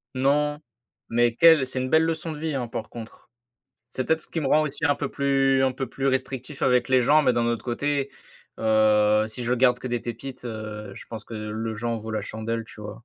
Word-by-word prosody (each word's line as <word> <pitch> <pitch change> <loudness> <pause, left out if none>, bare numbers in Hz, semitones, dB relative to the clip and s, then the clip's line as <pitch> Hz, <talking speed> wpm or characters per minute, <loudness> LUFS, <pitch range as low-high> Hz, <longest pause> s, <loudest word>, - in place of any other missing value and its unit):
Non, 145 +3 +1 0.5
mais 120 0 +2
quelle 160 -4 +6
c'est 130 0 -1
une 130 - -3
belle 160 0 +4
leçon 165 0 -2
de - - -8
vie, 160 -1 -3
hein, 125 -3 -2
par 115 -1 -6
contre. 115 0 -11 0.6
C'est 130 - -2
peut-être 160 0 +1
ce - - -6
qui 165 - -3
me 135 - -1
rend 155 +2 +4 0.2
un 145 -3 +3
peu 145 -1 -3
plus 135 -1 +2
un 130 - +3
peu 130 -1 -5
plus 135 +1 -2
restrictif 130 +1 -3
avec 125 0 +3
les 130 -1 +4
gens 150 +5 +4
mais 125 - +3
d'un 120 0 0
autre 115 -2 -2
côté, 140 +3 -1 0.5
heu, 110 -1 +3
si 120 +2 -5
je 125 +1 +1
garde 125 0 +3
que 130 - -7
des 120 -1 -2
pépites, 125 +2 -7
heu, 110 -3 -6
je - - -11
pense 110 -3 -7
que 115 - -9
le 110 +1 -4
jeu 120 +2 -4
en 115 -1 0
vaut 110 0 -7
la 110 -1 -2
chandelle, 110 +2 -4
tu 105 - -14
vois? 105 +2 -9
125 Hz, 235 wpm, -25 LUFS, 110-140 Hz, 0.6 s, quelle